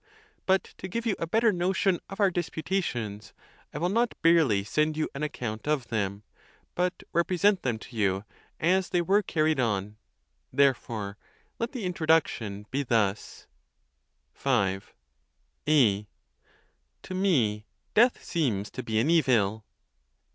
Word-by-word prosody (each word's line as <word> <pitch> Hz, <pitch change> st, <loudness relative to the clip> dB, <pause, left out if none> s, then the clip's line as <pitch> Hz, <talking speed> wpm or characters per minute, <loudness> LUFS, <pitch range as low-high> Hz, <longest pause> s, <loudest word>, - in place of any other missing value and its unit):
But 190 Hz, 0 st, +3 dB, 0.2 s
to 190 Hz, -, -5 dB
give 230 Hz, +5 st, -3 dB
you 215 Hz, -4 st, +1 dB
a 165 Hz, -, -2 dB
better 225 Hz, +5 st, +3 dB
notion 185 Hz, +1 st, +1 dB
of 195 Hz, -, -8 dB
our 200 Hz, -2 st, +4 dB
dispu 165 Hz, -2 st, -3 dB
tations, 115 Hz, -, -3 dB, 0.4 s
I -, -, -6 dB
will 170 Hz, +4 st, 0 dB
not 235 Hz, +4 st, 0 dB
barely 160 Hz, -12 st, +4 dB
send 155 Hz, +8 st, 0 dB
you 155 Hz, -, 0 dB
an 140 Hz, -, -6 dB
account 120 Hz, -6 st, -4 dB
of 145 Hz, -6 st, 0 dB
them, 100 Hz, -2 st, -2 dB, 0.5 s
but 180 Hz, 0 st, -1 dB
represent 185 Hz, +3 st, +2 dB
them 120 Hz, -4 st, -1 dB
to 120 Hz, +2 st, -13 dB
you 100 Hz, -2 st, 0 dB, 0.3 s
as 185 Hz, +3 st, +2 dB
they 175 Hz, -2 st, +1 dB
were 200 Hz, +4 st, +3 dB
carried 155 Hz, -6 st, +1 dB
on; 105 Hz, -3 st, -1 dB, 0.5 s
therefore 115 Hz, -7 st, 0 dB, 0.4 s
let 230 Hz, +1 st, -2 dB
the 240 Hz, -7 st, -4 dB
introduction 155 Hz, -, 0 dB
be 135 Hz, +2 st, 0 dB
thus: 110 Hz, -6 st, -1 dB, 0.9 s
V. 95 Hz, -1 st, +1 dB, 0.9 s
A. 105 Hz, -9 st, +4 dB, 1.0 s
To -, -, -7 dB
me 125 Hz, -, +1 dB, 0.3 s
death 240 Hz, +3 st, +4 dB
seems 115 Hz, -, -1 dB
to 130 Hz, -, -5 dB
be 110 Hz, -3 st, -2 dB
an 125 Hz, +9 st, +3 dB
evil. 110 Hz, -10 st, +2 dB
150 Hz, 140 wpm, -28 LUFS, 110-180 Hz, 1.0 s, our